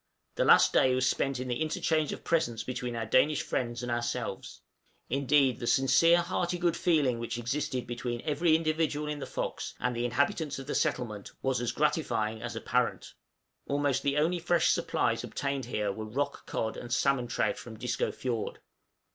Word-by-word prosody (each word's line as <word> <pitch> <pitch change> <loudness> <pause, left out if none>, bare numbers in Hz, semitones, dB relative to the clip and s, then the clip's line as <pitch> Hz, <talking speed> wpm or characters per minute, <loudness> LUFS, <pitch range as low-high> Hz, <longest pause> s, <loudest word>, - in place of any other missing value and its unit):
The - - 0
last - - +6
day 130 -1 +4
was 130 0 +2
spent 135 0 0
in 130 - -4
the 125 +4 -2
interchange 155 0 0
of - - -7
presents 120 -10 0
between 125 0 -4
our 115 -1 -2
Danish 135 +6 +3
friends 120 0 -2
and 120 - -3
ourselves; 120 0 -3 0.5
indeed, 135 -2 +3
the 120 - -4
sincere 165 +8 +5
hearty 175 0 -1
good 175 -1 +1
feeling 145 -9 +2
which 115 0 -4
existed 125 +1 -2
between 120 0 -4
every 155 +2 +2
individual 155 -2 0
in 150 -1 -3
the - - -5
'Fox' - - -4
and 125 0 -1
the 120 - -1
inhabitants 140 +5 0
of 135 - -7
the 145 - -3
settlement 105 -5 -2
was 130 -2 +1
as 120 - 0
gratifying 110 -8 0
as - - -5
apparent. - - -1 0.5
Almost 140 -2 +1
the 140 0 0
only 170 +4 +2
fresh 170 -1 +2
supplies - - 0
obtained 140 -1 -3
here 105 -1 -1
were 110 +2 -6
rock 140 +6 -3
cod 110 - -2
and 120 - -8
salmon 125 -1 +2
trout 120 - 0
from 115 -2 -10
Disco 120 +2 -1
fiord. 120 -4 -3
135 Hz, 180 wpm, -30 LUFS, 120-150 Hz, 0.5 s, last